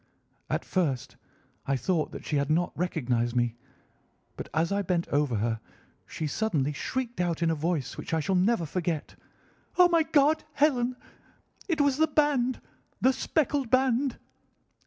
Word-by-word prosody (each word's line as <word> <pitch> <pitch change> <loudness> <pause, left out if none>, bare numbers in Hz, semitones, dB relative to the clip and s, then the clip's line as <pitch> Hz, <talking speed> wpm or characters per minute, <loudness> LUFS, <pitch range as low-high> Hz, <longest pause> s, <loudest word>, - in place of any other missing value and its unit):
At - - -1
first 150 -10 -1 0.5
I 135 - +2
thought 155 +5 0
that - - -9
she 150 - 0
had 140 0 0
not 170 +3 +1
recognised 120 -8 -1
me, 120 -1 +1 0.8
but - - -7
as 160 +3 0
I 200 0 +1
bent 175 -3 -1
over 145 -4 +1
her 110 +1 -1 0.5
she 160 - -4
suddenly 150 -4 0
shrieked 245 - -3
out 170 -1 0
in 165 - +3
a - - +2
voice 160 -2 -2
which - - -6
I 160 - +2
shall 160 +5 -1
never 185 0 +2
forget, 165 -1 -3 0.6
'Oh, 360 -1 +7
my 335 -1 +4
God! 310 -1 +3
Helen! 255 -4 +2 0.7
It 325 -5 +1
was 285 -2 +2
the 315 +1 +4
band! 285 -5 +2 0.4
The 260 - +4
speckled 285 -2 0
band! 260 +1 +2
180 Hz, 155 wpm, -28 LUFS, -, 0.8 s, Oh